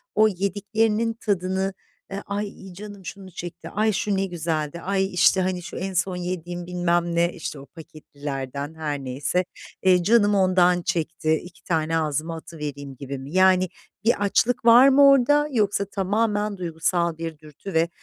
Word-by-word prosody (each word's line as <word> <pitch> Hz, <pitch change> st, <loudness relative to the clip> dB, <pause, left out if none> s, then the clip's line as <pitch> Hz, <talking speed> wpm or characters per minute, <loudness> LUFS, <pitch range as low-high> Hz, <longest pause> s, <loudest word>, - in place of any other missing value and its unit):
o 215 Hz, +1 st, +6 dB
yediklerinin 210 Hz, +3 st, 0 dB
tadını, 190 Hz, -3 st, -1 dB, 0.4 s
eee, 195 Hz, -, -4 dB
"ay 200 Hz, -2 st, -5 dB
canım 200 Hz, 0 st, -10 dB
şunu 190 Hz, -1 st, -8 dB
çekti", 175 Hz, 0 st, -8 dB
"ay 215 Hz, +1 st, +1 dB
şu 205 Hz, 0 st, -1 dB
ne 195 Hz, -, +1 dB
güzeldi", 165 Hz, -2 st, -3 dB
"ay, 195 Hz, 0 st, -1 dB
işte, 185 Hz, +1 st, +4 dB
hani, 185 Hz, -1 st, -1 dB
şu -, -, -8 dB
en 190 Hz, +1 st, -4 dB
son 185 Hz, +1 st, 0 dB
yediğim, 175 Hz, -1 st, -4 dB
bilmem 175 Hz, -1 st, 0 dB
ne" 170 Hz, +1 st, +2 dB
işte, 160 Hz, -4 st, -6 dB
o 135 Hz, -, -11 dB
paketlilerden 145 Hz, -3 st, -7 dB
her 150 Hz, -3 st, -3 dB
neyse, 135 Hz, +7 st, -1 dB, 0.4 s
eee, 180 Hz, -2 st, +4 dB
"canım 205 Hz, +1 st, +4 dB
ondan 180 Hz, -2 st, +3 dB
çekti, 165 Hz, -1 st, 0 dB
2 175 Hz, 0 st, -14 dB
tane 165 Hz, -1 st, 0 dB
ağzıma 155 Hz, +1 st, -2 dB
atıvereyim" 145 Hz, -4 st, -7 dB
gibi 140 Hz, +1 st, -6 dB
mi? 135 Hz, +4 st, -9 dB
Yani, 185 Hz, -1 st, +4 dB, 0.4 s
bir 225 Hz, -3 st, +2 dB
açlık 230 Hz, +4 st, +1 dB
var 240 Hz, +3 st, +8 dB
mı 280 Hz, +1 st, +7 dB
orada 290 Hz, +2 st, +4 dB
yoksa 205 Hz, -4 st, +1 dB
tamamen 205 Hz, +1 st, -1 dB
duygusal 170 Hz, -1 st, -1 dB
bir 165 Hz, -2 st, -5 dB
dürtü 155 Hz, +5 st, -10 dB
ve 165 Hz, +1 st, +2 dB
180 Hz, 160 wpm, -24 LUFS, 160-200 Hz, 0.4 s, var